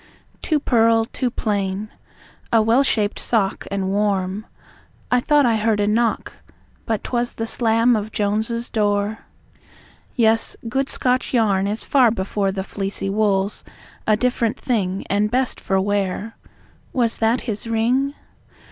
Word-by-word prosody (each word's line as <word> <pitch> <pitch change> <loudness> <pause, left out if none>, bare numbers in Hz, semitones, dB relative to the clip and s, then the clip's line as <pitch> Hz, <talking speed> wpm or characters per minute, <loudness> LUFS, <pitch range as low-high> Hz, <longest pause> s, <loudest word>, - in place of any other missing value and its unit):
Two 310 -2 +1
purl 230 -4 +3
two 250 +2 -2
plain. 205 -2 -2 0.6
A 230 - +5
well 225 +4 +4
shaped 215 -6 0
sock, 210 -5 0
And 195 -1 -2
warm. 200 0 -1 0.6
(I 250 - +4
thought 290 +2 +3
I 230 -2 +3
heard 215 -1 +1
a 205 - +2
knock, 225 +2 0 0.5
But 220 -2 -1
'twas 240 -1 -1
the 225 - -3
slam 230 +1 +2
of 215 0 -3
Jones's 220 +3 -1
door.) 205 0 0 1.0
Yes, 225 -1 +2
good 270 +4 -1
Scotch 255 0 0
yarn 200 -4 +2
is 210 +2 -3
far 260 -4 +4
before 200 -2 -1
The 190 0 -3
fleecy 195 0 -4
wools 200 -1 0 0.4
a 215 -1 +4
different 240 -1 0
thing, 195 -6 -1
And 205 +1 +1
best 255 +2 -1
for 195 0 +1
wear. 205 +2 -1 0.6
(Was 235 -4 0
that 225 +2 +1
his 220 -1 -5
ring?) 250 +5 +1
220 Hz, 140 wpm, -21 LUFS, 205-235 Hz, 1.0 s, A